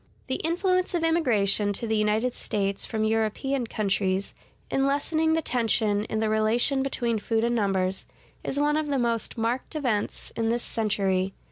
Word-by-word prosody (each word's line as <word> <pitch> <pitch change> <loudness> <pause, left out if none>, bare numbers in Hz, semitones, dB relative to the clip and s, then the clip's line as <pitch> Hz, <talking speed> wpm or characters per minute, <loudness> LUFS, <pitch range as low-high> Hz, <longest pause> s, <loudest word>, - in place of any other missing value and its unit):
The 260 - -2
influence 365 +2 0
of 335 - 0
immigration 215 - +2
to 230 - -2
the 220 -1 0
United 215 +3 +1
States 200 -4 -2
from 220 -2 -1
European 225 +4 0
countries, 195 -2 -1 0.4
in 270 0 +2
lessening 315 +3 +1
the 325 0 +1
tension 220 -4 +1
in 220 - -2
the 220 - +1
relation 220 +5 +2
between 240 -4 -1
food 225 +1 0
and 235 +1 +1
numbers, 195 -3 0 0.4
is 280 - 0
one 295 +1 +2
of 310 -1 -1
the 285 -1 0
most 235 -1 -1
marked 235 +6 -2
events 245 -9 -2
in 225 -1 0
this 235 +1 0
century. 195 -3 0
225 Hz, 165 wpm, -26 LUFS, 210-275 Hz, 0.4 s, immigration